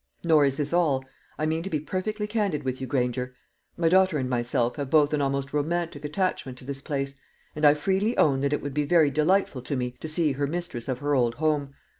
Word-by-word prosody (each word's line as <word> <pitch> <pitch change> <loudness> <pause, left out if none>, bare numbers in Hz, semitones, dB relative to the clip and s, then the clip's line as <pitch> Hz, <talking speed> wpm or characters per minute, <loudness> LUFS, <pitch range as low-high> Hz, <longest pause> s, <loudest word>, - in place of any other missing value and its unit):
Nor 155 -3 +5
is 135 -1 +1
this 145 +1 -2
all. 145 -7 +2 0.3
I 155 - -1
mean 160 +1 0
to 190 - -5
be 155 - -1
perfectly 210 +7 -3
candid 210 -7 -1
with 130 0 -3
you, 130 - -3
Granger. 125 -1 -1 0.4
My 170 - +2
daughter 185 -1 +4
and 130 -2 -1
myself 120 0 0
have 140 -2 -3
both 150 0 +4
an 150 - +1
almost 140 0 -1
romantic 160 0 -1
attachment 150 -5 -2
to 125 - -12
this 135 0 -5
place, 140 -2 -3 0.4
and 150 0 +1
I 145 - +6
freely 195 +9 0
own 135 -3 +4
that 140 0 +1
it 150 - -1
would 145 -1 -4
be 150 +1 +1
very 155 -2 +4
delightful 155 -2 +1
to 140 - -3
me 125 -1 -2
to - - -5
see 155 -1 +1
her 140 +1 -1
mistress 170 -7 -4
of 130 -2 -1
her 145 +2 -1
old 120 -3 +2
home. 145 -3 -1
145 Hz, 230 wpm, -26 LUFS, 135-165 Hz, 0.4 s, I